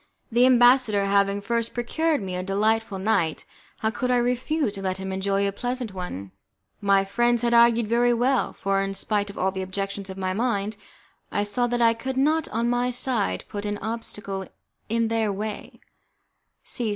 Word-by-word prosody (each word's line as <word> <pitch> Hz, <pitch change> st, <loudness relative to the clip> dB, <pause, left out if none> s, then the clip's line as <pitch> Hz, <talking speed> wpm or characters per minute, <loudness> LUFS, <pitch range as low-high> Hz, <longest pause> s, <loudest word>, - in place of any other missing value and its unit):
The 240 Hz, +2 st, +5 dB
ambassador 245 Hz, -5 st, +5 dB
having 200 Hz, 0 st, +2 dB
first 230 Hz, +2 st, -2 dB
procured 295 Hz, +3 st, 0 dB
me 185 Hz, -1 st, -4 dB
a 180 Hz, -, -2 dB
delightful 210 Hz, +2 st, 0 dB
night, 190 Hz, -6 st, 0 dB, 0.4 s
how 220 Hz, -, +1 dB
could 250 Hz, +3 st, -2 dB
I 250 Hz, -, +3 dB
refuse 250 Hz, +1 st, 0 dB
to 195 Hz, -, -6 dB
let 190 Hz, -1 st, -2 dB
him 190 Hz, 0 st, -5 dB
enjoy 195 Hz, +1 st, 0 dB
as 200 Hz, -, -1 dB
pleasant 245 Hz, 0 st, -3 dB
a -, -, -16 dB
one? 100 Hz, -, -6 dB, 0.5 s
My 195 Hz, -1 st, +3 dB
friends 240 Hz, +4 st, +1 dB
had 235 Hz, 0 st, +2 dB
argued 235 Hz, -1 st, +5 dB
very 240 Hz, +2 st, +3 dB
well, 250 Hz, +3 st, +1 dB
for, 195 Hz, 0 st, -1 dB
in 195 Hz, 0 st, -3 dB
spite 205 Hz, 0 st, 0 dB
of 200 Hz, -, -10 dB
all 190 Hz, +1 st, +1 dB
the 190 Hz, 0 st, -4 dB
objections 195 Hz, +1 st, -4 dB
of 190 Hz, -, -7 dB
my 185 Hz, -1 st, -1 dB
mind, 215 Hz, -1 st, -1 dB, 0.6 s
I 205 Hz, -, 0 dB
saw 245 Hz, +4 st, 0 dB
that 240 Hz, 0 st, +1 dB
I 230 Hz, 0 st, +5 dB
could 260 Hz, +3 st, -5 dB
not 310 Hz, +4 st, +2 dB
on 230 Hz, +2 st, -1 dB
my 245 Hz, +1 st, +1 dB
side 245 Hz, -, -1 dB
put 205 Hz, -1 st, -5 dB
any 205 Hz, 0 st, -2 dB
obstacle 205 Hz, -3 st, -5 dB, 0.4 s
in 230 Hz, 0 st, +1 dB
their 225 Hz, -2 st, +1 dB
way. 210 Hz, +1 st, -6 dB
215 Hz, 185 wpm, -25 LUFS, 195-240 Hz, 0.6 s, The